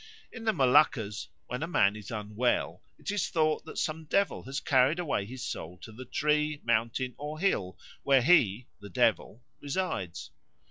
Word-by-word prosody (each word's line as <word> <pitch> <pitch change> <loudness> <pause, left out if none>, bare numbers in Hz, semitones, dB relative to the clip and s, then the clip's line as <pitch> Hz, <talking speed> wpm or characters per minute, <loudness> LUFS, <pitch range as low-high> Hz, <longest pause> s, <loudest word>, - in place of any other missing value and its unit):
In 225 -2 -9
the 220 - +4
Moluccas 130 - +3 0.2
when 125 +3 -5
a 165 - -2
man 100 - +3
is 105 -2 -9
unwell 105 +2 -1 0.2
it - - -4
is 205 -2 -1
thought 155 -2 +1
that - - -9
some 160 +1 -2
devil 200 +6 +1
has 135 +2 -3
carried 135 +2 +3
away 145 - -1
his 125 +2 -7
soul 85 +3 -6
to 110 - -11
the 125 +4 -10
tree, 150 +2 0
mountain, 115 +2 0
or 150 +1 -5
hill 105 - 0 0.2
where 135 -2 +4
he 125 - +4
(the 100 0 -10
devil) 110 +5 0 0.2
resides. 145 - -3
130 Hz, 170 wpm, -29 LUFS, 110-155 Hz, 0.2 s, the